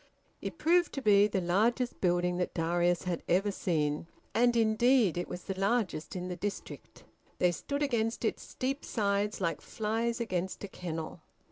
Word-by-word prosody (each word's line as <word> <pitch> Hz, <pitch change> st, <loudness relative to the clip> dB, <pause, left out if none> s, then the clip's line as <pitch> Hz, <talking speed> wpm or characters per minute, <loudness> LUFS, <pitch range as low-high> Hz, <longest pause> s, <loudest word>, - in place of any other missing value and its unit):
It -, -, -5 dB
proved 345 Hz, +2 st, +3 dB
to 275 Hz, -, -3 dB
be 205 Hz, -1 st, +6 dB
the 200 Hz, -2 st, -1 dB
largest 225 Hz, +8 st, +1 dB
building 175 Hz, -1 st, +2 dB
that 180 Hz, -, -2 dB
Darius 175 Hz, +1 st, +1 dB
had 180 Hz, -2 st, -2 dB
ever 195 Hz, +4 st, +3 dB
seen; 155 Hz, -5 st, -1 dB, 0.3 s
and 240 Hz, +1 st, +3 dB
indeed 230 Hz, -2 st, +4 dB
it 175 Hz, -, -2 dB
was 180 Hz, -, -6 dB
the 190 Hz, -1 st, -5 dB
largest 195 Hz, -6 st, 0 dB
in 180 Hz, 0 st, -3 dB
the 180 Hz, -, -4 dB
district; 200 Hz, +3 st, -6 dB, 0.3 s
they 180 Hz, -, +3 dB
stood 280 Hz, -, -3 dB
against 230 Hz, -4 st, 0 dB
its -, -, -1 dB
steep 270 Hz, +2 st, -3 dB
sides 205 Hz, -1 st, 0 dB
like 165 Hz, -5 st, -1 dB
flies 225 Hz, +2 st, -2 dB
against 185 Hz, -5 st, -2 dB
a -, -, -3 dB
kennel. 165 Hz, -4 st, -6 dB
200 Hz, 165 wpm, -31 LUFS, 175-230 Hz, 0.3 s, be